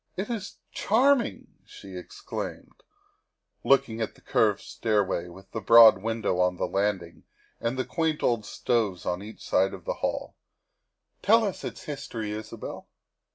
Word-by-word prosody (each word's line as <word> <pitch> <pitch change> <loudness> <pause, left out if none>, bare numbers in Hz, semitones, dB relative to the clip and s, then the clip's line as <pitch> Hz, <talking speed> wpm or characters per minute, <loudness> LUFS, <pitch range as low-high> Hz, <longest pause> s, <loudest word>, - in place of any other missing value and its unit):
"It 205 +5 -3
is 210 -4 -5
charming!" 250 +3 +1
she 95 -1 -12
exclaimed, 90 - -7 0.8
looking 130 -5 +3
at 110 - -3
the - - -20
curved - - +2
stairway, 100 -5 0
with 95 +2 -14
the 115 - -4
broad 110 -2 +8
window 110 -4 -1
on 90 0 +2
the - - 0
landing, 95 -4 -2 0.3
and 115 +2 -2
the 130 - -1
quaint 160 -2 -1
old 115 -3 +2
stoves 105 -5 -1
on 90 +1 -1
each 105 +1 -10
side 95 +1 +2
of 90 - -14
the - - -1
hall. - - -2 0.3
' - - -53
' - - -51
Tell 225 +2 +5
us 200 -4 -3
its - - -6
history, 115 -7 -5
Isabel." 110 +1 -7
110 Hz, 155 wpm, -27 LUFS, 95-135 Hz, 0.8 s, broad